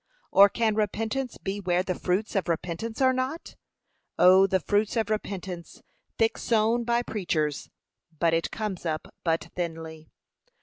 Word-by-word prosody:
or 200 +1 +8
can 225 0 +1
repentance 220 +4 -2
be 195 +1 -4
where 180 -2 +1
the 185 - -1
fruits 185 +5 -1
of 190 -3 0
repentance 175 +7 -3
are 260 -1 +5
not? 260 +6 -3 0.6
O 190 +2 +7
the 190 0 +2
fruits 205 +6 0
of 220 -1 0
repentance, 185 -5 -5 0.3
thick 225 0 +1
sown 230 +1 +2
by 235 +1 +1
preachers, 160 -10 -2 0.5
but 165 +1 +2
it 165 0 +1
comes 210 -5 -4
up 155 -2 -4
but 165 -1 0
thinly! 160 -2 -5
195 Hz, 145 wpm, -27 LUFS, 170-225 Hz, 0.6 s, or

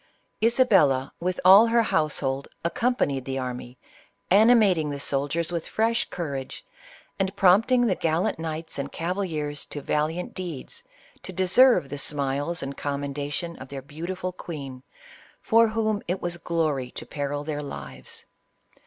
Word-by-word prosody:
Isabella, 195 - +3
with 180 +1 -2
all 195 +5 +9
her 230 0 +3
household, 140 -7 0 0.2
accompanied 200 - 0
the 135 0 -4
army, 125 -1 -5 0.5
ani 220 +5 +7
mating 185 -9 +3
the 140 -1 -4
soldiers 145 +5 -1
with 170 -2 -3
fresh 225 +1 0
courage, 140 -6 -5 0.5
and 195 +1 -1
prompting 210 +6 +4
the 210 - +2
gallant 165 -1 0
knights 160 -1 -4
and 140 0 -4
cavaliers 165 -5 -3
to 145 - -6
valiant 155 +5 -2
deeds, 175 -8 -6 0.4
to - - -6
deserve 190 - +4
the 145 +1 -5
smiles 145 +4 -1
and 140 0 -5
commendation 145 +4 -3
of 130 - -10
their 135 -1 -7
beautiful 180 +6 -5
queen, 140 -8 -7 0.6
for 230 0 +4
whom 215 -1 -1
it 180 +2 -1
was 175 0 -2
glory 155 -7 -1
to - - -8
peril 145 0 -3
their 150 -1 -3
lives. 70 - -8
160 Hz, 140 wpm, -25 LUFS, 140-190 Hz, 0.6 s, all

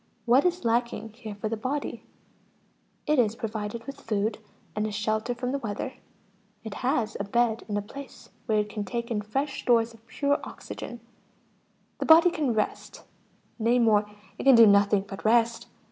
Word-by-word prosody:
What 250 +6 +4
is 355 -5 0
lacking 230 -1 0
here 220 -3 -8
for 205 +2 -4
the 225 - -2
body? 260 +6 -4 1.0
It 300 -2 +2
is 225 -2 +2
provided 220 0 -4
with 275 0 -8
food, 210 0 -1 0.4
and 210 0 0
a - - -4
shelter 215 +3 -1
from 250 +1 -3
the 280 - -1
weather, 230 +3 -4 0.7
it 220 -3 -6
has 245 -4 0
a - - -1
bed 230 +2 +1
and 205 -1 -2
a 205 - -2
place 275 +6 -11 0.2
where 220 -2 +2
it 210 0 +1
can 210 0 -4
take 235 +3 -4
in 210 -2 0
fresh 270 +7 -2
stores 230 -1 +2
of 225 +1 -20
pure 285 +2 0
oxygen; 240 -1 -8 1.0
the - - -2
body 335 +2 +8
can 285 -8 -1
rest, 215 - -3 0.6
nay 230 +2 +3
more, 215 -3 +3 0.3
it - - -3
can 270 -2 +8
do 230 -1 +9
nothing 200 -1 +4
but 195 -1 -8
rest. 230 +1 +2
230 Hz, 175 wpm, -27 LUFS, 215-250 Hz, 1.0 s, do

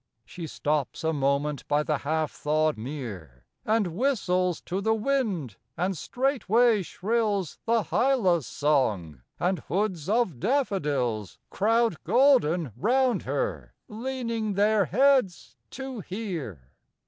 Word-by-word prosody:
She 170 -3 -7
stops 150 -1 -2
a 160 0 +1
moment 140 0 0
by 150 +1 +2
the 150 0 -1
half 155 +1 -1
thawed 155 +1 0
mere 105 - -7 0.2
And 210 -6 0
whistles 185 - +1
to 185 +3 -3
the 220 +2 +2
wind, 215 - -1 0.2
and 185 +3 0
straightway 240 - +2
shrills 205 -1 -1
The 230 -1 +2
hyla's 195 - +2
song, 105 - 0 0.2
and 180 +1 0
hoods 185 -4 -2
of 215 - +1
daffodils 145 - -1
Crowd 225 -2 +1
golden 180 - +3
round 250 - +2
her, - - -3
leaning 230 -2 -3
their 205 0 +3
heads 195 - +2
to 265 -2 -6
hear. 165 - -6
185 Hz, 115 wpm, -27 LUFS, 150-230 Hz, 0.2 s, golden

